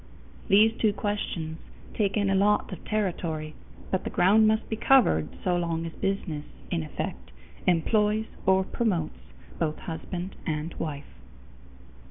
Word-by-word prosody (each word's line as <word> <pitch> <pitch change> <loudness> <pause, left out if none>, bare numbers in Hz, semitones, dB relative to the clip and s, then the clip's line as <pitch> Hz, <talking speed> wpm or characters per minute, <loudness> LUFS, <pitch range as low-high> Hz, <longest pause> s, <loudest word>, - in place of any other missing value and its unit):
These 215 +2 +6
two 215 -2 +3
questions 175 -7 -3 0.3
take 200 -2 0
in 200 -2 +2
a - - +3
lot 205 +1 +2
of - - -9
territory, 170 -7 -2 0.4
but 190 - 0
the - - -3
ground 210 +5 +5
must 220 +1 +2
be 220 - -2
covered 215 - +4
so 180 -1 +2
long 165 -1 -1
as 165 - -4
business, 195 -6 -2 0.3
in 170 -2 0
effect, 65 - -5 0.4
employs 210 +5 +3 0.2
or 190 0 +5
promotes 185 -6 -1 0.4
both 155 -2 0
husband 175 +2 -5
and 155 +1 -2
wife. 145 -2 -4
185 Hz, 140 wpm, -27 LUFS, 160-210 Hz, 0.4 s, These